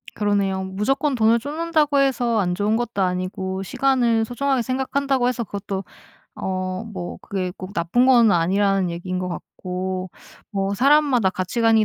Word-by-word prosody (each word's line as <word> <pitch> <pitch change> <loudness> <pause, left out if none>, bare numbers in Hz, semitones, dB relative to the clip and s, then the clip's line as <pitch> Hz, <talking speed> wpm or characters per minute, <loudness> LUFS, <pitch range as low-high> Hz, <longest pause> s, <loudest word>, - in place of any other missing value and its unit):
그러네요. 200 -2 0
무조건 265 +10 0
돈을 230 0 +4
쫓는다고 300 +1 +1
해서 245 -4 +2
안 180 -3 0
좋은 205 +3 +1
것도 240 -4 -2
아니고 190 +1 -2
시간을 235 0 +2
소중하게 265 +2 0
생각한다고 265 +1 0
해서 250 -1 -1
그것도 200 -2 -5 0.5
어 185 -1 -2
뭐 190 -6 -6
그게 185 -2 -3
꼭 185 +2 -8
나쁜 180 +9 +2
건 235 -5 +6
아니라는 190 +2 +2
얘기인 180 +2 -4
것 180 0 -3
같고 185 +1 -5 0.4
뭐 195 -1 -1
사람마다 275 -4 +4
가치관이 220 +4 +2
205 Hz, 340 characters per minute, -22 LUFS, 190-250 Hz, 0.5 s, 건